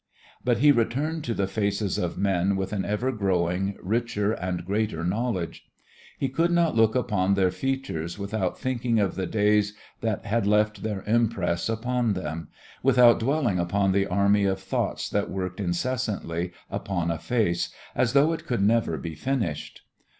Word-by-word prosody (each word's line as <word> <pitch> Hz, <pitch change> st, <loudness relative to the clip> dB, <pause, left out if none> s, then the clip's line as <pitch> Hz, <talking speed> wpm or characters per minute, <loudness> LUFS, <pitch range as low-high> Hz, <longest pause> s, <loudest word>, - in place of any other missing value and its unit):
But 120 Hz, -2 st, +2 dB
he 145 Hz, +4 st, +6 dB
returned 145 Hz, +6 st, 0 dB
to 115 Hz, -, -1 dB
the 100 Hz, -, +1 dB
faces 100 Hz, 0 st, -1 dB
of 85 Hz, -, -2 dB
men 95 Hz, 0 st, +1 dB
with 95 Hz, +1 st, -3 dB
an 100 Hz, -2 st, -1 dB
ever 105 Hz, +6 st, -1 dB
growing, 95 Hz, -2 st, 0 dB
richer 110 Hz, 0 st, 0 dB
and 90 Hz, -4 st, -3 dB
greater 100 Hz, -4 st, -1 dB
knowledge. 95 Hz, -1 st, -2 dB, 0.5 s
He 135 Hz, -, 0 dB
could 165 Hz, +6 st, +1 dB
not 170 Hz, -4 st, +2 dB
look 110 Hz, 0 st, +4 dB
upon 100 Hz, -6 st, +1 dB
their 95 Hz, -2 st, +2 dB
features 135 Hz, -12 st, -3 dB
without 100 Hz, -2 st, -2 dB
thinking 120 Hz, -3 st, 0 dB
of 100 Hz, -3 st, +1 dB
the 95 Hz, -1 st, -3 dB
days 105 Hz, 0 st, +2 dB, 0.2 s
that 110 Hz, -3 st, -2 dB
had 105 Hz, 0 st, 0 dB
left 105 Hz, 0 st, +2 dB
their 105 Hz, -2 st, -3 dB
impress 105 Hz, -6 st, +1 dB
upon 120 Hz, 0 st, 0 dB
them, 80 Hz, -3 st, -4 dB, 0.3 s
without 125 Hz, -3 st, +6 dB
dwelling 120 Hz, -, +1 dB
upon 95 Hz, +3 st, +1 dB
the 100 Hz, +1 st, +2 dB
army 100 Hz, +2 st, +3 dB
of 95 Hz, 0 st, 0 dB
thoughts 95 Hz, 0 st, -2 dB
that 100 Hz, 0 st, 0 dB
worked 95 Hz, -1 st, -4 dB
incessantly 95 Hz, -3 st, -2 dB, 0.2 s
upon 90 Hz, -4 st, -2 dB
a 80 Hz, -, -3 dB
face, 105 Hz, -5 st, 0 dB, 0.2 s
as 120 Hz, -1 st, +1 dB
though 145 Hz, +4 st, +4 dB
it 165 Hz, -, -6 dB
could 120 Hz, -5 st, 0 dB
never 110 Hz, -6 st, +2 dB
be 80 Hz, +4 st, -5 dB
finished. 90 Hz, -, -3 dB
105 Hz, 165 wpm, -26 LUFS, 95-120 Hz, 0.5 s, he